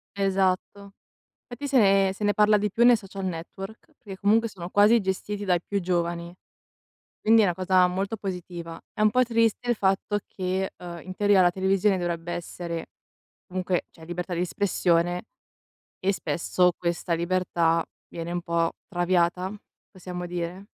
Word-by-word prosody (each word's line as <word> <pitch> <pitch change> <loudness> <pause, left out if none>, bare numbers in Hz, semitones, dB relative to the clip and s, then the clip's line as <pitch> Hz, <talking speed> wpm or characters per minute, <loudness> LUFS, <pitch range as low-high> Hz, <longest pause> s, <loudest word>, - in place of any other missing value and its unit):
Esatto. 195 0 0 0.5
Fatti 280 +4 -6
se 275 - +2
ne 195 -2 +4
se 210 - -7
ne 205 - +3
parla 210 0 +5
di 210 +1 0
più 235 - +2
nei 245 -1 +8
social 195 -1 -7
network, 190 - -7
perché 195 -5 -10
comunque 220 +3 +3
sono 175 -3 -8
quasi 210 +4 +5
gestiti 200 +2 -3
dai 180 -2 +2
più 200 -1 -1
giovani, 170 -1 -1 0.9
quindi 225 +1 +6
è 210 - +4
una 175 - +1
cosa 185 0 +4
molto 195 +4 -2
positiva. 175 -4 -6
È - - -4
un 215 - +6
po' 255 +3 +4
triste 230 0 +1
il 240 - +3
fatto 200 +1 +1
che, 190 0 -2
uhm, 175 -1 -8
in 185 0 -8
teoria 205 -2 +4
la 175 -1 +5
televisione 190 +1 +2
dovrebbe 175 -1 -3
essere 170 -1 -5 0.6
comunque 185 -1 -1
c'è 160 - -14
libertà 175 +2 -4
di 170 - -1
espressione 175 -2 +1 0.8
e 195 +2 +1
spesso 180 +2 +1
questa 170 0 -1
libertà 170 -1 +1 0.3
viene 170 0 -6
un 175 - -2
po' 170 -1 0 0.2
traviata? 180 0 +1 0.4
Possiamo 180 -1 -6
dire? 175 +2 -5
185 Hz, 160 wpm, -26 LUFS, 175-200 Hz, 0.9 s, nei